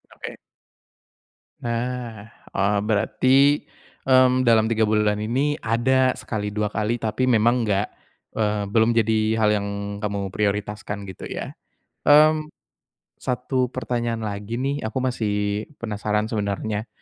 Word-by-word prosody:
Oke. -, -, -8 dB, 1.2 s
Nah, 115 Hz, -2 st, -4 dB, 0.2 s
oh 100 Hz, +1 st, +2 dB
berarti, 130 Hz, +7 st, +3 dB, 0.4 s
mmm, 130 Hz, -1 st, +4 dB
dalam 110 Hz, -1 st, +5 dB
3 110 Hz, -1 st, +2 dB
bulan 105 Hz, -1 st, +2 dB
ini 135 Hz, +8 st, 0 dB
ada 130 Hz, +3 st, +2 dB
sekali, 105 Hz, -2 st, -4 dB
2 105 Hz, -1 st, -1 dB
kali, 110 Hz, +2 st, 0 dB
tapi 115 Hz, +2 st, -1 dB
memang 120 Hz, 0 st, +3 dB
enggak, 100 Hz, 0 st, +1 dB, 0.4 s
eee, 105 Hz, -1 st, 0 dB
belum 115 Hz, +1 st, +3 dB
jadi 110 Hz, -1 st, +2 dB
hal 110 Hz, -1 st, +3 dB
yang 100 Hz, -, -4 dB, 0.3 s
kamu 100 Hz, -2 st, -3 dB
prioritaskan 105 Hz, 0 st, -2 dB
gitu 95 Hz, -2 st, -8 dB
ya. -, -, -5 dB, 0.6 s
Mmm, 155 Hz, +1 st, +6 dB, 0.7 s
1 125 Hz, 0 st, -1 dB
pertanyaan 120 Hz, -3 st, -2 dB
lagi 105 Hz, +1 st, -4 dB
nih, 135 Hz, 0 st, -2 dB
aku 130 Hz, +3 st, -3 dB
masih 105 Hz, -4 st, -1 dB
penasaran 105 Hz, -1 st, -2 dB
sebenarnya. 105 Hz, +1 st, -2 dB
110 Hz, 120 wpm, -23 LUFS, 105-125 Hz, 1.2 s, Mmm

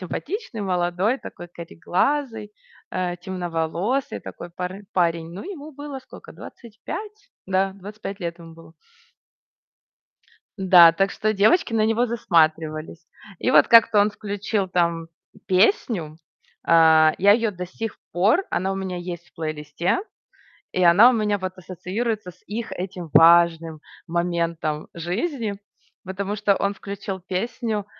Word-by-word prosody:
симпатичный, 285 Hz, -, -5 dB
молодой, 180 Hz, +5 st, 0 dB
такой 175 Hz, -8 st, -10 dB
кареглазый, 210 Hz, -, -2 dB, 0.4 s
э, 180 Hz, -1 st, -2 dB
темноволосый, 175 Hz, +7 st, -2 dB
такой 175 Hz, -, -9 dB
пар 180 Hz, +3 st, -6 dB
парень. 165 Hz, -2 st, 0 dB
Ну, 185 Hz, -, -7 dB
ему 315 Hz, -5 st, -8 dB
было 285 Hz, -1 st, -7 dB
скока, 260 Hz, -, -14 dB
25? 415 Hz, -, -9 dB, 0.2 s
Да, 190 Hz, +1 st, +1 dB
25 200 Hz, +1 st, -8 dB
лет 170 Hz, 0 st, -4 dB
ему 165 Hz, -1 st, -12 dB
было. 165 Hz, -1 st, -16 dB, 1.9 s
Н-да, 180 Hz, -3 st, +8 dB
так 195 Hz, +4 st, +1 dB
что, 215 Hz, 0 st, -1 dB
девочки 220 Hz, -, +3 dB
на 215 Hz, -1 st, +3 dB
него 225 Hz, +3 st, +2 dB
засматривались. 160 Hz, -6 st, 0 dB, 0.3 s
И -, -, 0 dB
вот, 150 Hz, -2 st, +6 dB
как-то, 230 Hz, -2 st, +6 dB
он 205 Hz, +1 st, +3 dB
включил, 205 Hz, -1 st, -3 dB
там 170 Hz, -2 st, 0 dB, 0.4 s
песню. 185 Hz, -, +1 dB, 0.5 s
А, 160 Hz, -1 st, +6 dB
я 200 Hz, +2 st, +6 dB
её 225 Hz, 0 st, +1 dB
до 180 Hz, -2 st, -7 dB
сих 225 Hz, +5 st, -6 dB
пор, 200 Hz, -, +3 dB
она 190 Hz, +1 st, -1 dB
у -, -, -3 dB
меня 190 Hz, -1 st, -4 dB
есть 175 Hz, -1 st, -7 dB
в -, -, -35 dB
плейлисте. 155 Hz, -, -2 dB, 0.7 s
И 185 Hz, -, 0 dB
она 180 Hz, +8 st, +7 dB
у -, -, 0 dB
меня, 210 Hz, -3 st, 0 dB
вот, 185 Hz, 0 st, -6 dB
ассоциируется 190 Hz, +3 st, -4 dB
с -, -, -24 dB
их, 225 Hz, +3 st, -5 dB
этим 180 Hz, -2 st, -6 dB
важным 165 Hz, -1 st, +5 dB, 0.3 s
моментом 170 Hz, -3 st, -2 dB
жизни. 205 Hz, -, -3 dB, 0.5 s
Потому 195 Hz, +2 st, -4 dB
что 200 Hz, -1 st, +2 dB
он 200 Hz, -, 0 dB
включил 195 Hz, -1 st, -6 dB
песню, 210 Hz, +3 st, -3 dB
185 Hz, 135 wpm, -23 LUFS, 170-215 Hz, 1.9 s, Н-да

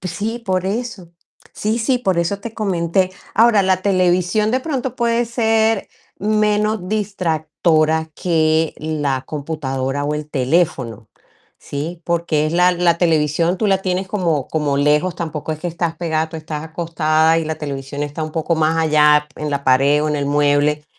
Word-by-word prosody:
Pues 185 Hz, -2 st, -5 dB
sí, 225 Hz, +5 st, -3 dB
por 185 Hz, -2 st, 0 dB
eso. 220 Hz, -3 st, -4 dB, 0.4 s
Sí, 220 Hz, +3 st, -1 dB
sí, 250 Hz, +2 st, +1 dB
por 190 Hz, -7 st, 0 dB
eso 170 Hz, +4 st, 0 dB
te 220 Hz, +2 st, -7 dB
comenté. 185 Hz, -3 st, 0 dB, 0.2 s
Ahora, 225 Hz, -2 st, +5 dB
la 185 Hz, -1 st, +2 dB
televisión 185 Hz, +2 st, +2 dB
de 255 Hz, +3 st, +1 dB
pronto 260 Hz, -4 st, -3 dB
puede 235 Hz, 0 st, +1 dB
ser 225 Hz, -2 st, +1 dB, 0.3 s
menos 210 Hz, -1 st, +1 dB
distractora 160 Hz, -5 st, 0 dB
que 160 Hz, -2 st, +1 dB
la 145 Hz, -4 st, -2 dB
computadora 140 Hz, -2 st, -3 dB
o 150 Hz, +1 st, -1 dB
el 150 Hz, 0 st, -5 dB
teléfono, 135 Hz, -, -1 dB, 0.5 s
¿sí? 160 Hz, +5 st, -6 dB
Porque 170 Hz, -3 st, 0 dB
es 155 Hz, -, -3 dB
la 180 Hz, +1 st, +4 dB
la 170 Hz, -1 st, +2 dB
televisión 165 Hz, +1 st, +2 dB
tú 215 Hz, -, +1 dB
la 195 Hz, -1 st, +3 dB
tienes 185 Hz, 0 st, -2 dB
como 170 Hz, -9 st, -1 dB
como 150 Hz, -3 st, 0 dB
lejos, 150 Hz, +5 st, +2 dB
tampoco 160 Hz, -2 st, -4 dB
es 155 Hz, -, -6 dB
que 175 Hz, -, -2 dB
estás 170 Hz, -1 st, -2 dB
pegada, 160 Hz, -1 st, -1 dB
tú 160 Hz, -, -7 dB
estás 155 Hz, -1 st, -6 dB
acostada 160 Hz, -1 st, +1 dB
y 165 Hz, -, -2 dB
la 160 Hz, 0 st, -2 dB
televisión 140 Hz, -1 st, -5 dB
está 145 Hz, +2 st, -4 dB
un 155 Hz, 0 st, -5 dB
poco 165 Hz, +1 st, 0 dB
más 160 Hz, 0 st, +1 dB
allá 150 Hz, -2 st, +4 dB
en 150 Hz, -1 st, -4 dB
la 140 Hz, -1 st, -2 dB
pared 140 Hz, +3 st, +4 dB
o 155 Hz, -, 0 dB
en 150 Hz, -, 0 dB
el 145 Hz, -, -1 dB
mueble, 145 Hz, +1 st, +2 dB
165 Hz, 170 wpm, -19 LUFS, 150-190 Hz, 0.5 s, Ahora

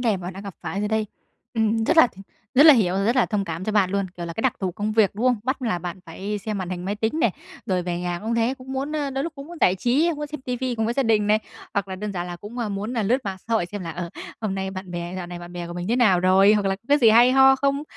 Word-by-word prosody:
đề 225 Hz, -5 st, +2 dB
mà 185 Hz, -, -9 dB
bạn 185 Hz, -, -4 dB
đang 195 Hz, +2 st, -9 dB
gặp 200 Hz, -3 st, -8 dB
phải 195 Hz, -, -3 dB
rồi 210 Hz, -, -1 dB
đây. 220 Hz, 0 st, 0 dB, 0.5 s
Ừm, 225 Hz, 0 st, +1 dB
rất -, -, +2 dB
là 320 Hz, -, +8 dB
thì 195 Hz, -, -12 dB, 0.3 s
rất 285 Hz, +5 st, +7 dB
là 310 Hz, -, +10 dB
hiểu, 190 Hz, -7 st, +2 dB
rất 235 Hz, -, +2 dB
là 255 Hz, -, +4 dB
thông 205 Hz, -3 st, -1 dB
cảm 170 Hz, +1 st, -5 dB
cho 215 Hz, -, -2 dB
bạn 200 Hz, -3 st, +3 dB
luôn, 200 Hz, 0 st, 0 dB
kiểu 170 Hz, -1 st, -5 dB
là 170 Hz, -, -5 dB
cái 225 Hz, -, -4 dB
đặc 260 Hz, -, +3 dB
thù 185 Hz, -2 st, -1 dB
công 210 Hz, +4 st, -2 dB
việc, 215 Hz, -3 st, +4 dB
đúng 230 Hz, +5 st, 0 dB
không? 250 Hz, -1 st, +4 dB
Bắt 260 Hz, +1 st, -2 dB
là 220 Hz, -8 st, 0 dB
bạn 175 Hz, +2 st, -6 dB
phải 200 Hz, +5 st, -4 dB
xem 210 Hz, 0 st, -4 dB
màn 185 Hz, -1 st, -4 dB
hình 180 Hz, 0 st, -4 dB
máy 200 Hz, -, -1 dB
tính 225 Hz, +9 st, -1 dB
này, 235 Hz, -, +3 dB, 0.4 s
rồi 185 Hz, -2 st, 0 dB
về 175 Hz, 0 st, -3 dB
nhà 175 Hz, -1 st, -2 dB
cũng 225 Hz, +2 st, -2 dB
thế, 235 Hz, +3 st, +1 dB
cũng 260 Hz, +1 st, -9 dB
muốn, 275 Hz, +3 st, -3 dB
ơ, 290 Hz, -2 st, -1 dB
đôi 270 Hz, +1 st, -2 dB
lúc 335 Hz, -, -4 dB
cũng 275 Hz, 0 st, -8 dB
muốn 345 Hz, +1 st, -10 dB
giải 180 Hz, -, +4 dB
trí, 265 Hz, -, +2 dB
muốn 295 Hz, 0 st, -4 dB
xem 300 Hz, 0 st, -7 dB
ti 250 Hz, -1 st, -3 dB
vi 255 Hz, 0 st, -2 dB
cùng 225 Hz, -1 st, -1 dB
với 235 Hz, -, -1 dB
gia 275 Hz, -, +2 dB
đình 220 Hz, -4 st, +2 dB
này, 210 Hz, +1 st, +4 dB, 0.4 s
hoặc 200 Hz, -2 st, -1 dB
là 190 Hz, -, -5 dB
đơn 210 Hz, +2 st, -4 dB
giản 175 Hz, -2 st, -3 dB
là 175 Hz, 0 st, -6 dB
cũng, 210 Hz, +7 st, -9 dB
à, 235 Hz, -3 st, -1 dB
muốn 205 Hz, +4 st, -4 dB
là 230 Hz, -, 0 dB
lướt 245 Hz, +6 st, +1 dB
mạng 195 Hz, -1 st, -3 dB
xã 230 Hz, -, +1 dB
hội 195 Hz, -6 st, +1 dB
xem 205 Hz, +2 st, -6 dB
là, 165 Hz, -, -5 dB
ờ, 175 Hz, -1 st, -5 dB, 0.3 s
hôm 215 Hz, -3 st, -2 dB
nay 190 Hz, 0 st, -3 dB
bạn 185 Hz, -1 st, -7 dB
bè 175 Hz, 0 st, -5 dB
dạo 180 Hz, -2 st, -5 dB
này 175 Hz, 0 st, -7 dB
bạn 175 Hz, 0 st, -10 dB
bè 175 Hz, -1 st, -5 dB
của 170 Hz, -, -7 dB
mình 175 Hz, +2 st, -5 dB
thế 235 Hz, -, +2 dB
nào 195 Hz, -8 st, +4 dB
rồi? 190 Hz, +2 st, +5 dB
Hoặc 205 Hz, -2 st, +1 dB
là 195 Hz, -, 0 dB
có 195 Hz, -, -37 dB
cái 290 Hz, +1 st, +5 dB
gì 230 Hz, -4 st, +6 dB
hay 240 Hz, +3 st, +6 dB
ho 270 Hz, 0 st, +6 dB
không? 280 Hz, +1 st, 0 dB
210 Hz, 335 wpm, -23 LUFS, 185-245 Hz, 0.5 s, là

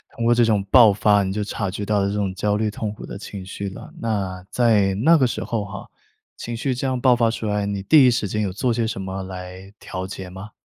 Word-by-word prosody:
通 115 Hz, -, -4 dB
过 120 Hz, -, +5 dB
这 120 Hz, 0 st, +4 dB
种 105 Hz, -3 st, +2 dB
爆 115 Hz, -4 st, +8 dB
发， 105 Hz, 0 st, +3 dB
你 95 Hz, -, -2 dB
就 105 Hz, +1 st, -2 dB
察 100 Hz, -1 st, -3 dB
觉 100 Hz, +2 st, -5 dB
到 105 Hz, 0 st, +1 dB
了 100 Hz, -, +1 dB
这 100 Hz, -, -2 dB
种 100 Hz, -2 st, -1 dB
焦 105 Hz, +2 st, 0 dB
虑、 105 Hz, 0 st, 0 dB
痛 105 Hz, 0 st, -4 dB
苦 -, -, -10 dB
的 -, -, -7 dB
情 100 Hz, -2 st, -8 dB
绪 100 Hz, +1 st, -5 dB
了。 95 Hz, -, -11 dB
那 95 Hz, -5 st, -3 dB
在 105 Hz, -4 st, +3 dB
那 160 Hz, +12 st, +5 dB
个 130 Hz, -4 st, +3 dB
时 -, -, -4 dB
候 115 Hz, -3 st, -2 dB
哈， 100 Hz, -1 st, -9 dB, 0.5 s
情 120 Hz, -, -5 dB
绪 130 Hz, +3 st, -1 dB
这 130 Hz, +2 st, -2 dB
样 130 Hz, -1 st, -1 dB
爆 125 Hz, 0 st, +4 dB
发 115 Hz, -1 st, +2 dB
出 115 Hz, -1 st, -4 dB
来， 105 Hz, -1 st, 0 dB
你 100 Hz, -1 st, -3 dB
第 140 Hz, +4 st, +6 dB
一 -, -, +5 dB
时 115 Hz, -3 st, -1 dB
间 105 Hz, +2 st, -2 dB
有 100 Hz, -3 st, -1 dB
做 115 Hz, +5 st, 0 dB
些 115 Hz, -1 st, 0 dB
什 110 Hz, -4 st, -4 dB
么 95 Hz, 0 st, -5 dB
来 95 Hz, +1 st, -9 dB
调 95 Hz, 0 st, -6 dB
节 95 Hz, -1 st, -7 dB
吗？ 95 Hz, +4 st, -10 dB
105 Hz, 285 characters per minute, -22 LUFS, 95-115 Hz, 0.5 s, 爆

